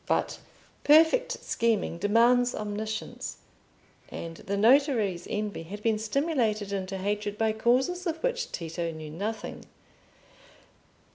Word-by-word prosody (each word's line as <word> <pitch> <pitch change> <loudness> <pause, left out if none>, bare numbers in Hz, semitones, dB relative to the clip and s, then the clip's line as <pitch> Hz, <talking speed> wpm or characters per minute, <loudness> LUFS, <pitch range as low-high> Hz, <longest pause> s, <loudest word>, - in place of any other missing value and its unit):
But - - 0 0.4
perfect 325 +12 +5
scheming 225 -7 0
demands 240 +4 +4
omniscience, 215 +1 -4 0.7
and 165 -1 -7
the 200 +1 -3
notary's 225 - +3
envy 210 -4 -3
had 200 +6 -8
been 220 -2 +2
stimulated 220 -4 0
into 195 0 -3
hatred 205 +1 -2
by 220 0 +2
causes 265 - +1
of 325 -1 -1
which - - -1
Tito 165 0 -3
knew 155 -2 -7
nothing. 210 +7 -5
215 Hz, 115 wpm, -28 LUFS, 200-250 Hz, 0.7 s, perfect